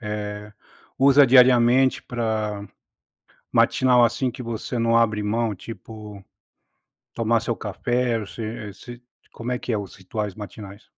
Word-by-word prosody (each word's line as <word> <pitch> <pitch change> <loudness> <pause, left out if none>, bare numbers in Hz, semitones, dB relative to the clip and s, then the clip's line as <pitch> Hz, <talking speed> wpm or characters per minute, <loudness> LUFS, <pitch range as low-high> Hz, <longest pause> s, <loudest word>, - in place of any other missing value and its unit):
eh, 105 -1 -5 0.5
usa 140 +1 +6
diariamente 125 0 +5
pra 110 -3 -3 0.9
matinal, 125 -2 +4
assim, 120 +2 +1
que 125 - -9
você 115 +1 -4
não 115 0 +3
abre 110 -2 +2
mão, 110 +1 0
tipo 105 -1 -10 0.9
tomar 115 0 +2
seu 115 0 -2
café, 115 +3 -1
se 110 -2 -6
se 120 0 -12 0.3
como 120 +2 -6
é 125 - 0
que 125 - -4
é - - +1
os 100 -2 -7
rituais 105 -6 -5
matinais? 100 -1 -10
115 Hz, 130 wpm, -23 LUFS, 105-120 Hz, 0.9 s, usa